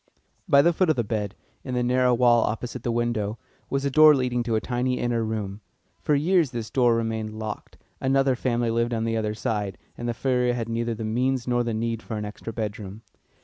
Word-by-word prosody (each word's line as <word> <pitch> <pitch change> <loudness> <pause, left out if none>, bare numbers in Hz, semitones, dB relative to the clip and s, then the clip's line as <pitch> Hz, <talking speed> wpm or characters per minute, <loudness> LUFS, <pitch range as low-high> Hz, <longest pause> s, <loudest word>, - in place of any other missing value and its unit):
By 140 -3 +6
the 170 - +4
foot 180 +1 +2
of 155 - +3
the 120 - 0
bed, 105 -1 -3 0.3
in 130 -2 -4
the 125 - +1
narrow 125 0 +3
wall 120 -1 +5
opposite 115 +3 -4
the 120 - -1
window, 115 -2 -1 0.3
was 140 0 -1
a 140 - 0
door 155 +1 +8
leading 125 -2 0
to 120 -2 -1
a - - +3
tiny 125 +2 -1
inner 120 -1 0
room. 105 -2 -4 0.4
For 150 - +2
years 165 +1 +3
this 115 -2 -5
door 120 -3 +3
remained 110 -1 -2
locked; 110 -1 -6 0.2
another 135 0 +2
family 120 -2 0
lived 115 +1 0
on 110 - -1
the 115 0 -1
other 110 -1 -1
side, 105 -4 -2 0.2
and 120 - -4
the 120 - -2
furrier 125 -1 +1
had 115 -1 -3
neither 115 0 -1
the 110 0 -5
means 125 +3 0
nor 120 -1 +2
the 115 -2 -2
need 115 0 -2
for 110 - -5
an 105 - -3
extra 105 +2 -7
bedroom. 105 -1 -5
120 Hz, 220 wpm, -25 LUFS, 110-125 Hz, 0.4 s, door